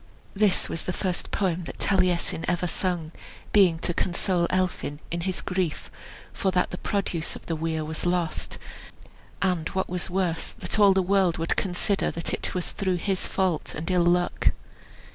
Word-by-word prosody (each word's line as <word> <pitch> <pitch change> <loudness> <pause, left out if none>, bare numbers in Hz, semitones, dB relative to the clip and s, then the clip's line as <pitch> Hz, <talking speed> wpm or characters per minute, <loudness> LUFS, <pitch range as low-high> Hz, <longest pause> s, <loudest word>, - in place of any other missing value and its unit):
This 200 -1 +3
was 165 - -4
the 180 - -1
first 180 -1 -2
poem 180 -3 0
that - - -7
Taliesin 180 -4 +1
ever 175 +1 +1
sung, 175 -3 -1 0.4
being 185 -5 +5
to 175 - 0
console 175 0 +1
Elphin 185 -5 -1
in 170 0 -1
his 185 +1 -1
grief 180 -4 -2 0.4
for 195 - 0
that 185 -1 +1
the 180 - -5
produce 190 -5 -1
of - - -10
the 165 - -2
weir 160 0 -2
was 160 +1 -4
lost, 175 -2 -1 0.9
and 180 -4 +1
what 190 - +1
was 180 +1 -2
worse, 180 -3 -1
that - - -2
all 200 -2 +7
the 190 0 +2
world 190 -2 +3
would 165 0 0
consider 195 +1 0
that 170 - -3
it - - -2
was 180 - -2
through 190 -3 0
his 190 +1 0
fault 185 -5 0
and 165 +5 -3
ill 180 -1 +4
luck. 175 0 +2
180 Hz, 175 wpm, -26 LUFS, 170-190 Hz, 0.9 s, all